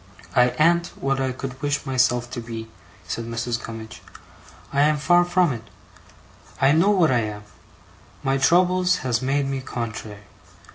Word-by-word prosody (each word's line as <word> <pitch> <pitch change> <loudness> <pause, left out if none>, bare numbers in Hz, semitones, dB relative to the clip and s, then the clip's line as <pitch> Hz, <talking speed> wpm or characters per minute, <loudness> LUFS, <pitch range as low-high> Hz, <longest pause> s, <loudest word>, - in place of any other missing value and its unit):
'I 125 0 +6
an't 170 +2 +3
what 135 0 0
I 130 -1 0
could 130 +1 -7
wish 145 -1 -1
myself 125 -2 +1
to - - -4
be,' 115 -1 -7 0.4
said 115 +5 -4
Mrs. 115 +1 -3
Gummidge. 110 -1 -8 0.7
'I 140 - +3
am 150 +1 +3
far 175 +4 +4
from 175 -4 +2
it. 115 -1 -9 0.9
I 135 +1 +4
know 165 +6 +4
what 180 -8 +4
I 125 - +3
am. 105 -2 -4 0.8
My 135 0 +1
troubles 180 +4 +3
has 120 -2 0
made 135 +2 0
me 135 -1 -3
contrary. 110 -4 -6
130 Hz, 155 wpm, -23 LUFS, 115-155 Hz, 0.9 s, I